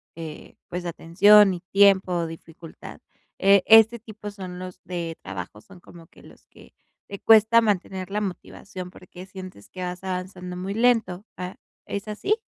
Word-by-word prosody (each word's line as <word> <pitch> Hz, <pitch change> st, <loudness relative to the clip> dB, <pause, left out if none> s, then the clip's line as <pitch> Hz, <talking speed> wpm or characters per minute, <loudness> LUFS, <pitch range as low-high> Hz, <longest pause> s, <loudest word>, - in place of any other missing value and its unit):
eh, 160 Hz, -2 st, -9 dB
pues, 180 Hz, 0 st, -6 dB
atención 195 Hz, +4 st, +5 dB
y 175 Hz, -, -9 dB
tiempo, 190 Hz, -4 st, +3 dB
dificultad, 165 Hz, 0 st, -12 dB, 0.4 s
eh, 195 Hz, 0 st, +5 dB
este 225 Hz, +1 st, +7 dB
tipo 215 Hz, -2 st, -9 dB
son 185 Hz, -3 st, -9 dB
los 185 Hz, 0 st, -9 dB
de 170 Hz, -2 st, -5 dB
trabajos 95 Hz, +2 st, -8 dB
son 190 Hz, -2 st, -16 dB
como 170 Hz, -1 st, -15 dB
que -, -, -21 dB
los -, -, -18 dB
que -, -, -19 dB, 0.3 s
te 200 Hz, -, -7 dB
cuesta 225 Hz, +1 st, +6 dB
mantener 195 Hz, -3 st, -2 dB
la 210 Hz, +1 st, -1 dB
motivación, 185 Hz, -1 st, -7 dB
porque 180 Hz, 0 st, -13 dB
sientes 185 Hz, -, -11 dB
que 185 Hz, -, -9 dB
vas 180 Hz, +1 st, -5 dB
avanzando 180 Hz, -1 st, -5 dB
muy 190 Hz, +2 st, -5 dB
lento, 225 Hz, -5 st, +1 dB
ah, 180 Hz, 0 st, -6 dB, 0.3 s
¿es 200 Hz, +1 st, -5 dB
así? 400 Hz, -, -1 dB
185 Hz, 160 wpm, -24 LUFS, 180-205 Hz, 0.4 s, este